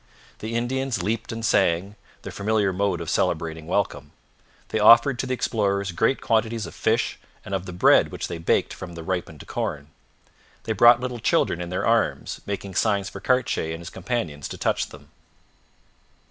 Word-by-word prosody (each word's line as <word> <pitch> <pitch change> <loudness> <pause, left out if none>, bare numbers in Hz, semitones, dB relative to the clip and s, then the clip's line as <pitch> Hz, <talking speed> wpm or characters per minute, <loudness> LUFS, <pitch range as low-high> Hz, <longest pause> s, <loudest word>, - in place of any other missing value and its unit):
The 110 +2 -4
Indians 125 -2 -1
leaped 110 +3 -2
and 115 0 -4
sang, 90 +3 +2 0.3
their - - -6
familiar 105 -1 0
mode 95 -2 0
of 85 - -6
celebrating 80 0 -1
welcome. 100 +2 -2 0.6
They 110 - -1
offered 120 +4 +6
to 130 - -2
the 130 - 0
explorers 100 -5 0
great 110 +10 +1
quantities 115 -1 0
of - - -9
fish - - 0 0.3
and 95 - -6
of 95 -1 -2
the - - -5
bread 90 - +4
which - - -4
they 85 - -5
baked 80 - +1
from 90 -2 -9
the 85 - -7
ripened 85 -4 -4
corn. 75 0 -4 0.7
They 110 - -1
brought 120 +3 +6
little 125 -1 -4
children 90 -5 +1
in 85 - -5
their 90 - -2
arms, - - 0
making 100 -1 -4
signs 100 -1 +1
for 100 - -9
Cartier 120 -8 0
and - - -9
his 85 - -9
companions 90 - -3
to - - -7
touch - - 0
them. - - -14
100 Hz, 175 wpm, -24 LUFS, 85-115 Hz, 0.7 s, offered